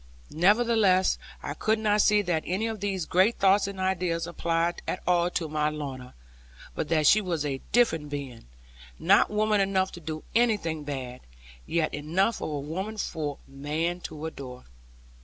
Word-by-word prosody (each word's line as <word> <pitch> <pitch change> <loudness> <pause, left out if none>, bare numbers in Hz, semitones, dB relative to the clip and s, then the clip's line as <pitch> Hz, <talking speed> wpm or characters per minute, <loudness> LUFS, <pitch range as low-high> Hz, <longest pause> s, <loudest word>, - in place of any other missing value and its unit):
Nevertheless 200 0 +3 0.2
I - - -3
could 220 0 +1
not 210 -1 +2
see 210 0 +4
that 175 -4 0
any 190 +5 -1
of 225 -2 -3
these 190 -3 -2
great 190 +8 +3
thoughts 195 +1 +4
and 200 -1 -6
ideas 180 -3 0
applied 170 0 -1
at 185 - -2
all 175 -1 +3
to 170 -2 -2
my 150 0 0
Lorna; 135 -4 -7 0.6
but 150 - -3
that 155 -2 +2
she 215 +8 +6
was 170 -6 -2
a 135 -2 -3
different 165 -12 +2
being; 140 - -6 0.5
not - - +4
woman 210 -1 +2
enough 190 -1 +1
to - - -9
do 155 -1 -6
anything 205 -10 +1
bad, 130 -3 -5 0.5
yet 165 -2 0
enough 175 +9 0
of - - -3
a 150 -2 -3
woman 190 +9 -4
for 150 -7 -3
man 155 +6 -2
to 160 -3 -7
adore. 130 -5 -8
170 Hz, 165 wpm, -27 LUFS, 150-200 Hz, 0.6 s, she